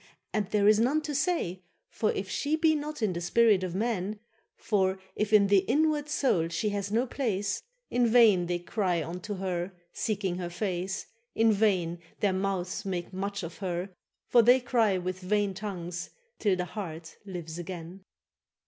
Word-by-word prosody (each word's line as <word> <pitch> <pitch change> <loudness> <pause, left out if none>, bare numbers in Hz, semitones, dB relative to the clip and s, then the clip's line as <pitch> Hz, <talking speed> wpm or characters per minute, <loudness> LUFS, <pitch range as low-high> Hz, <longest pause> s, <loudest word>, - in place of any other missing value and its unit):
and 210 -3 0
there 205 -1 +2
is 215 0 +6
none 260 +7 +3
to 305 -1 -4
say; 275 - 0 0.3
For 215 - +1
if 190 - -3
she 285 +10 0
be 315 0 +3
not 300 -3 -3
in 200 -4 +2
the 170 - -4
spirit 205 +2 +4
of 180 -1 -3
men, 210 -1 -1 0.4
For 190 -3 +1 0.2
if 210 0 -1
in 210 -2 +7
the 200 0 +5
inward 295 +8 +1
soul 255 - +2
she 170 +6 -1
hath 200 -1 -3
no 235 +4 +2
place, 205 -6 -1 0.3
In 245 -1 +3
vain 220 -7 +5
they 175 0 0
cry 175 -1 -1
unto 180 +5 -5
her, 185 -1 -3 0.2
seeking 195 -4 -1
her 175 -1 -4
face, 185 0 -3 0.3
In 225 0 +4
vain 185 -5 +1 0.2
their 200 -2 +2
mouths 190 0 -2
make 185 -2 -4
much 200 +1 -3
of 165 +1 -7
her; 185 0 -3 0.3
for 240 - +5
they 245 +3 +6
Cry 230 -6 +2
with 185 0 -3
vain 200 +1 0
tongues, 180 -3 -5 0.3
till 200 -3 +2
the 180 0 -2
heart 165 -4 -7
lives 175 -4 -6
again. 175 +1 -7
195 Hz, 175 wpm, -29 LUFS, 180-220 Hz, 0.4 s, in